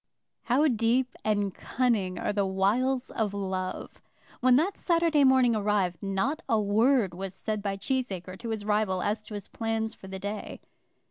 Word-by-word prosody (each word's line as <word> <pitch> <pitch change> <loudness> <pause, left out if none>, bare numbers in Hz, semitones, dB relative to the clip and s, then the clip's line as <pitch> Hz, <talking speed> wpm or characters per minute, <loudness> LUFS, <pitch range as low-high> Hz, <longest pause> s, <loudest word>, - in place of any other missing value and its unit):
How 275 +6 +3
deep 245 +1 +1
and 205 -3 0
cunning 225 -8 0
are - - -1
the 200 -1 +1
wiles 240 +8 +1
of 210 -3 -1
love! 190 -2 -4 0.4
When 255 0 +5
that 340 +9 +2
Saturday 335 -4 +2
morning 260 -3 +5
arrived 205 -4 0
not 200 +10 -1
a 225 -3 +3
word 215 0 +3
was 190 +1 -6
said 215 +2 -3
by 195 -1 -2
Cheesacre 195 -6 -3
to 235 - -6
his 215 -2 -3
rival 210 -3 +1
as 210 +1 -1
to 210 0 -9
his 205 -1 -6
plans 225 -1 -2
for 190 - -13
the 190 0 -6
day. 205 +2 -5
215 Hz, 170 wpm, -28 LUFS, 195-250 Hz, 0.4 s, When